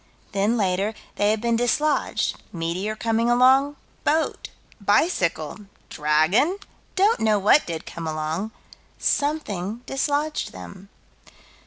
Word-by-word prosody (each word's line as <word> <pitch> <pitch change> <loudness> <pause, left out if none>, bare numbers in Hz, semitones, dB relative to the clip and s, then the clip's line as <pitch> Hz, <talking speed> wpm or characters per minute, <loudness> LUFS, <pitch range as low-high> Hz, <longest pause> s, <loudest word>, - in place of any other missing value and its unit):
Then, 205 +4 +1
later, 195 +1 0 0.2
they 205 - +3
had 215 0 +1
been 235 0 +1
dislodged 280 +6 0
meteor 175 +5 -3
coming 230 +1 0
along 260 +4 +4 0.3
boat 315 +2 0 0.3
bicycle 200 - +1 0.2
dragon 155 - +2 0.4
don't 410 +4 +3
know 215 -1 +3
what 210 +9 +4
did 165 -2 -5
come 165 -2 -6
along 155 +6 -2 0.5
something 235 - -1
dislodged 290 +3 -1
them. 95 - -11
215 Hz, 110 wpm, -24 LUFS, 180-270 Hz, 0.5 s, along